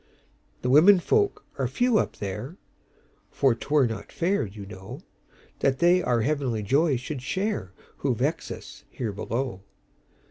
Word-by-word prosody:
"The 125 - 0
women 180 +8 +7
folk 410 - +1
are - - +1
few 245 -3 +2
up - - -2
there; 115 - -5 0.7
For 135 -3 +2
't 115 - -9
were 145 -3 +5
not 110 -3 -5
fair, 180 - 0
you 100 0 -9
know, 95 -1 -9 0.6
That 135 -1 +2
they 175 +4 +4
our 120 -8 +1
heavenly 130 -5 -1
joy 140 - +3
should 130 +3 -5
shareWho 185 - -3
vex - - -1
us - - -9
here 115 -4 -4
below. 115 +1 -3
135 Hz, 145 wpm, -26 LUFS, 110-175 Hz, 0.7 s, women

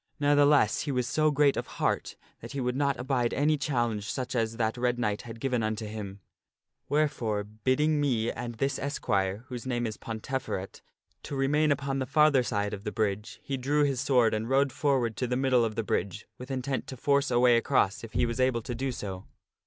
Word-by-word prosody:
Ne'theless, 145 -5 +4
he 145 - -1
was 125 -2 0
so 155 +5 +2
great 145 -1 +3
of - - -3
heart - - -1 0.2
that - - -9
he 140 - -3
would 125 -1 -1
not 140 0 0
abide 125 -2 0
any 150 +2 +3
challenge 120 -8 -1
such 130 0 -4
as 115 -2 -1
that 110 -2 0
Red 125 0 0
Knight 105 -4 -1
had 115 -1 -9
given 125 -1 0
unto 110 0 -2
him; 105 -2 -7 0.7
where 150 +1 +3
fore, 110 -7 -2
bidding 130 +9 0
me 120 -5 +1
and 120 0 -6
this 135 +4 -1
esquire 100 -7 -1
(whose 125 0 -6
name 120 -2 -1
is 110 -2 -4
Pontefe^et) 115 -4 -4 0.4
to 145 - -6
remain 145 +3 +2
upon 140 -1 -1
the 130 - -2
farther 150 -1 +4
side 105 -4 -1
of 100 -1 -6
the 105 - -3
bridge, 105 0 -2
he 135 - -3
drew 145 +4 +1
his 135 -4 0
sword 125 -4 +3
and 110 +2 -2
rode 135 +1 +3
forward 130 -5 +1
to 125 - -1
the 125 +1 0
middle 130 -2 +3
of 110 -2 -2
the 115 - -1
bridge 95 -2 -2
with 125 +1 -9
intent 130 0 -2
to 130 - -7
force 140 +2 +2
a 120 -1 +2
way 120 -1 +6
across 105 -3 +1
if 115 - -9
he - - +2
was 115 +2 -3
able 130 -2 +2
so - - -22
to 120 - -4 0.2
do. 100 -5 -6
125 Hz, 215 wpm, -28 LUFS, 110-140 Hz, 0.7 s, way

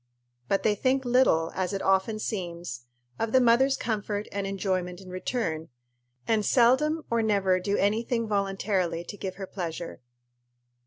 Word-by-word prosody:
But 195 - +1
they 215 - +3
think 265 +5 +1
little, 240 -10 +3
as 185 +1 -2
it 195 - -2
often 195 +3 +2
seems, 170 - -5 0.3
of 225 - -1
the 260 - +5
mother's 255 +3 +4
comfort 210 -2 -2
and 200 -1 -2
enjoyment 185 -2 -2
in 185 -2 -11
return, 180 -5 -3 0.6
and 220 -2 +2
seldom 270 +8 +3
or 235 0 +2
never 200 -4 +2
do 200 +2 -1
any 210 +3 +2
thing 230 -1 -1
voluntarily 195 -4 0
to 205 - -8
give 190 -2 -5
her 195 - -6
pleasure. 170 -5 -6
200 Hz, 155 wpm, -27 LUFS, 185-230 Hz, 0.6 s, the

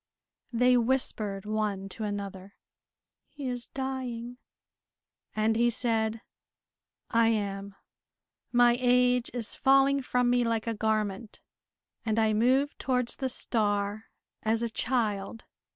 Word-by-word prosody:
They 250 +1 +4
whispered 225 -5 0
one 210 -2 -2
to 220 - -7
another, 200 -1 -6 0.7
"He 285 -2 -9
is 245 -1 -3
dying." 250 -2 -5 1.0
And 215 +1 +2
he 240 +1 +3
said, 225 -2 0 0.9
"I 230 0 +4
am. 200 -3 -2 0.8
My 240 -1 +5
age 250 0 +3
is 235 -3 -3
falling 275 +1 +4
from 250 -1 +1
me 245 0 +3
like 230 -1 -1
a 230 - -1
garment, 215 -1 -2 0.6
and 220 -1 -1
I 220 -1 +3
move 260 +6 +2
towards 250 -2 -1
the 265 -2 -2
star 205 -3 -1 0.4
as 225 +1 0
a 230 - -2
child. 225 -3 -1
230 Hz, 120 wpm, -28 LUFS, 215-250 Hz, 1.0 s, My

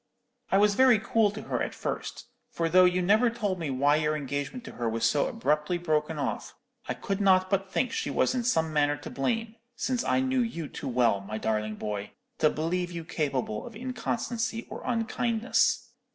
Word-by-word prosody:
I 195 - +5
was 205 0 +4
very 255 +1 +6
cool 220 0 +2
to 210 +2 -7
her - - -2
at - - -3
first; - - -4 0.2
for 165 - -1
though 185 +3 +6
you 180 0 +2
never 215 +6 +4
told 210 -5 -2
me 160 -4 -3
why 140 +3 +3
your 155 0 +1
engagement 145 - -4
to - - -8
her 120 -1 -2
was 115 +1 0
so 140 +4 +2
abruptly 165 - 0
broken 155 -2 0
off, 145 - -3 0.3
I - - -1
could 195 0 -3
not 185 -1 +4
but 195 -1 0
think 250 - 0
she - - -2
was - - +2
in 250 -2 -1
some 160 -9 +1
manner 145 -1 +2
to - - -9
blame, 225 - -2 0.2
since 250 0 -1
I - - +2
knew 260 -1 +1
you 170 -10 -3
too - - -7
well, 120 -5 +2
my 105 +2 -6
darling 110 -1 -1
boy, 105 -1 -5 0.3
to 155 - +5
believe 175 +4 -1
you 170 -1 -5
capable 135 -10 -2
of 230 - -11
inconstancy 235 -1 -3
or - - -6
unkindness. 230 0 +1
180 Hz, 195 wpm, -28 LUFS, 145-225 Hz, 0.3 s, very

